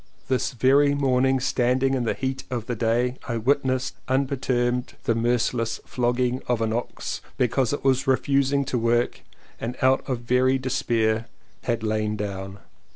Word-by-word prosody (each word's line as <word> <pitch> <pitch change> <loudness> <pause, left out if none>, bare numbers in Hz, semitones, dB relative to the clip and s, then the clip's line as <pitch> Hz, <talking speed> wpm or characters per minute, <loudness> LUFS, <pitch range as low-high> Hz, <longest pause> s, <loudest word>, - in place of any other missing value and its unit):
This 130 -1 0
very 140 +4 +4
morning 135 -1 +2
standing 130 +1 +1
in 125 -3 0
the - - 0
heat 130 -1 -3
of 120 -4 -3
the 120 - -3
day 120 +3 +1
I 120 -3 -1
witnessed 130 +2 0
unperturbed 130 -2 0
the 115 - +2
merciless 115 0 0
flogging 125 +1 0
of 125 -2 +1
an 110 -1 0
ox 120 +1 -4 0.2
because 125 0 +1
it 145 - -3
was 135 -1 +2
refusing 140 +1 +2
to 130 -2 -1
work 120 +1 +1 0.4
and 120 +2 -4
out 130 +1 +3
of 125 -2 -1
very 125 +2 +2
despair 115 -3 0 0.4
had 115 -2 -1
lain 110 -1 0
down. 100 -1 -5
125 Hz, 155 wpm, -24 LUFS, 115-130 Hz, 0.4 s, very